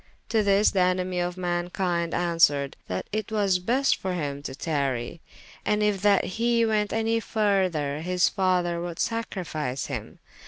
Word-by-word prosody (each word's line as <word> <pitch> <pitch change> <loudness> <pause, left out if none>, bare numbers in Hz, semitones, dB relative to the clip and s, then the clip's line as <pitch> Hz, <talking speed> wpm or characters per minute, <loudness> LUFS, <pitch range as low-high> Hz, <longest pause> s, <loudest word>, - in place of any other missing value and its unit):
To 225 - +3
this 200 +1 +4
the 195 - 0
enemie 180 0 +1
of 175 0 -1
mankynde 175 -1 -1
answered, 165 -5 +2
that 90 0 -3
it 215 +1 -3
was 200 -4 +2
best 250 +9 +2
for 190 -1 -3
hym 145 -4 -3
to 135 - -6
tarrye, 140 -2 -2 0.4
and 210 0 +1
yf 210 -2 +1
that 200 -2 +4 0.2
he 235 0 +3
went 210 -2 +1
anye 225 +1 0
further, 185 -10 0
his 180 +1 +2
father 180 -3 +1
would 175 -1 -5
sacrifice 165 - -3
him. - - -6
180 Hz, 155 wpm, -26 LUFS, 165-210 Hz, 0.4 s, this